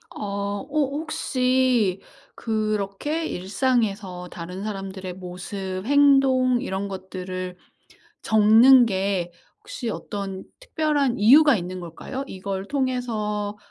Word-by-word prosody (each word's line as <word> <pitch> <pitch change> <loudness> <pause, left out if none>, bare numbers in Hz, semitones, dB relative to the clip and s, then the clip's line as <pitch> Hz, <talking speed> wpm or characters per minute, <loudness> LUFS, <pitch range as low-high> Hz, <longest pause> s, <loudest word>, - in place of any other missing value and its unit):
어. 200 0 -3
어 - - -8
혹시 260 - +1 0.3
그렇게 215 +7 -2
일상에서 200 - -1
다른 180 +3 -7
사람들의 195 -3 -5
모습, 185 +1 -6
행동 270 -3 +4
이런 200 -6 -3
것들을 185 -1 -6 0.6
적는 225 +4 +6
게 190 -3 -1 0.3
혹시 240 -3 -6
어떤 195 -3 -5 0.2
특별한 300 - 0
이유가 275 +5 +7
있는 185 0 -5
걸까요? 180 +10 -6
이걸 195 -1 -5
통해서 220 -6 -2
210 Hz, 215 characters per minute, -24 LUFS, 190-255 Hz, 0.6 s, 이유가